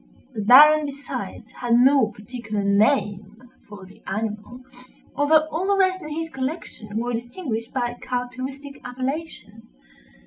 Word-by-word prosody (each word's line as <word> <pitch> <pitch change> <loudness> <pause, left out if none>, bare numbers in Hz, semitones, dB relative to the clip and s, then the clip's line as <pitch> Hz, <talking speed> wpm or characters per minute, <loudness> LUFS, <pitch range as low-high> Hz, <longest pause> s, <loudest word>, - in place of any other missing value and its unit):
The 215 - -4
Baron, 295 +7 +7
besides, 280 0 -7
had 240 -1 0
no 260 0 +5
particular 215 -1 -5
name 200 0 +1 0.3
for 200 -2 -10
the 190 - -17
animal, 215 +4 -4 0.5
although 310 +2 +4
all 335 +5 -2
the 400 0 +2
rest 375 -1 +2
in 305 - -8
his 325 +2 -3
collection 265 -7 -5
were 240 +2 -2
distinguished 235 -1 -4
by 240 -2 -2
characteristic 255 +3 -5
appellations. 255 -3 -5
250 Hz, 130 wpm, -23 LUFS, 215-290 Hz, 0.5 s, Baron